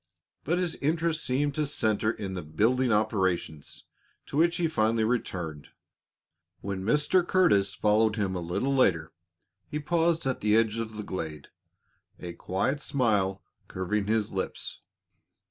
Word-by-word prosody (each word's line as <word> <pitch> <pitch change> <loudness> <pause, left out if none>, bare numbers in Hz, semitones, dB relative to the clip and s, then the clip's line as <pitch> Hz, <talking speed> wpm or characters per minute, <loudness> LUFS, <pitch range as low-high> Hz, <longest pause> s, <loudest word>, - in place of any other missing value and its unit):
But 170 +5 0
his 180 -2 0
interest 160 +2 0
seemed 140 +3 0
to 150 0 0
center 110 -6 +1
in 100 -4 -4
the 90 - -4
building 115 +11 +1
operations, 95 -8 -1 0.4
to - - -8
which 170 +3 +3
he 170 - +1
finally 115 -6 +1
returned. 90 -10 -2 0.9
When 95 -1 -4
Mr. 150 - +3
Curtis 105 - +3
followed 110 +1 +3
him 100 -4 -1
a 90 - -2
little 90 +11 -1
later, 80 -11 +2 0.6
he 150 - -3
paused 165 +1 +1
at 130 -1 -1
the 105 0 +3
edge 115 0 +1
of 110 -1 -5
the 105 - -4
glade, 80 -7 -6 0.7
a 85 -1 -6
quiet 100 +12 -2
smile 105 -10 0 0.2
curving 100 +2 -2
his 110 -1 0
lips. 95 - -4
110 Hz, 145 wpm, -28 LUFS, 95-145 Hz, 0.9 s, which